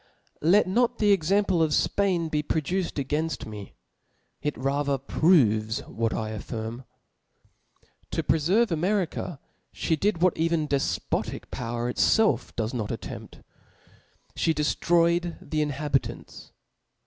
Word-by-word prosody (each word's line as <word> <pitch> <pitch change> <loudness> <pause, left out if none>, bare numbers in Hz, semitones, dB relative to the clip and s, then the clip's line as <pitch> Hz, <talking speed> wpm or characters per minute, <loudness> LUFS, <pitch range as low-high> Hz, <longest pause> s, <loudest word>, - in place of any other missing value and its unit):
LE 185 +7 +5
T - - -13
not 240 +3 +2
the 210 -1 +3
example 195 0 +2
of 155 -2 +2
Spain 185 -5 +1
be 150 -1 0
produced 165 +5 -1
againft 150 +4 -2
me 105 -3 -9 0.3
\ - - -45
it 150 - -2
rather 140 +1 0
proves 125 - +2
what 115 -3 -2
I 110 -1 -3
afBrm, 110 +3 -6 1.2
To - - -2
preferve 185 +9 +2
America 175 -2 -1 0.4
Ihe 160 -2 0
did 195 -2 +1
what 185 - +4
even 165 -1 0
defpotic 140 -1 -2
power 120 0 -3
itfelf 180 - +2
does 110 +1 -2
not 110 -4 -3
attempt, - - -7 0.9
fhe 160 - +1
deftroyed 170 +3 +2
the 155 -1 -2
inhabitants. 145 -1 -3
155 Hz, 125 wpm, -26 LUFS, 130-175 Hz, 1.2 s, LE